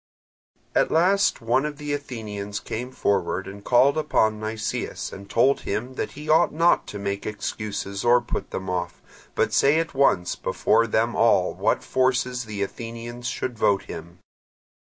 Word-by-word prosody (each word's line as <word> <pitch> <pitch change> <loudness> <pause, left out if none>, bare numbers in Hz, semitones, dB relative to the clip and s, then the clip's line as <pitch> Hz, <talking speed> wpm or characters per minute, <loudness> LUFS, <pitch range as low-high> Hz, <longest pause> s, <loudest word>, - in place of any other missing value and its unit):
At - - +3
last 190 +2 +3
one 120 +4 +2
of 150 -1 -4
the 150 -1 -3
Athenians 105 -7 -5
came 125 +3 -5
forward 95 -6 0
and 100 +1 -9
called 135 +7 +4
upon 110 -7 +1
Nicias 110 +1 -4
and 100 0 -10
told 130 +6 +3
him 120 +6 -3
that - - -4
he 150 +2 -9
ought 160 +2 +4
not 165 +3 +3
to 105 - -6
make 100 0 -3
excuses 105 -2 -4
or 120 +1 +5
put - - -5
them 95 - -5
off, 90 -1 -3 0.4
but - - +1
say 145 +3 +4
at 165 0 -3
once 135 -10 +2
before 115 - +1
them 115 +2 +1
all 100 -5 +3
what - - 0
forces 125 -1 0
the 105 -2 -3
Athenians 115 +3 -6
should 125 -2 -4
vote 100 -2 +3
him. 85 +2 -9
115 Hz, 160 wpm, -24 LUFS, 100-130 Hz, 0.4 s, or